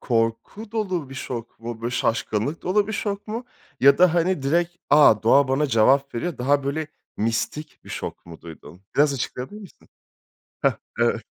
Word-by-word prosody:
korku 115 - -2
dolu 185 - -2
bir - - -8
şok 120 -3 -6
mu? 115 -1 -6
Böyle 120 - -1
şaşkınlık 115 +4 -1
dolu 200 +2 +2
bir 220 - -3
şok 205 -1 -3
mu? 230 +3 -4 0.4
Ya 140 +1 +6
da 180 -2 +5
hani 175 -3 +1
direkt, 170 +5 0
"A! 145 -5 +8
Ooğa 130 +6 +3
bana 135 +3 +2
cevap 135 +3 +3
veriyor!" 170 +8 -3
Daha 140 +3 +1
böyle, 150 +3 -2 0.3
mistik 115 +7 -2
bir - - -14
şok - - -6
mu 85 -1 -11
duydun? 85 +2 -12
Biraz 145 0 +4
açıklayabilir 135 - -5
misin? 195 - -15 0.7
Hah, - - +2 0.2
evet. 120 -1 +2
140 Hz, 170 wpm, -23 LUFS, 115-175 Hz, 0.7 s, A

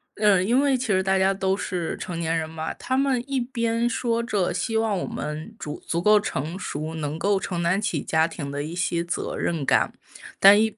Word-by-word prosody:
嗯， 200 -3 +4
因 250 +4 +4
为 275 -2 +3
其 255 0 -3
实 190 -2 +2
大 190 0 +2
家 190 +1 +3
都 190 0 0
是 175 -5 -3
成 175 -2 -5
年 165 0 0
人 160 0 -3
嘛， 160 0 -4
他 260 - -2
们 265 -2 +2
一 270 -2 0
边 235 -1 0
说 235 0 0
着 200 -7 0
希 220 +6 -1
望 220 -3 +1
我 - - -2
们 155 +8 -5
竹 150 0 -6
足 170 - -1
够 210 +3 +6
成 165 -2 -3
熟， 155 -3 -4
能 155 0 -3
够 200 +1 +2
承 180 -2 -3
担 180 +4 +1
起 180 -8 -1
家 160 0 +2
庭 140 -4 -6
的 145 +1 -3
一 155 +3 -6
些 175 -1 0
责 170 - -3
任 160 -5 -1
感。 - - +3 0.5
但 205 +2 +8
一 220 0 0
190 Hz, 240 characters per minute, -24 LUFS, 165-225 Hz, 0.5 s, 但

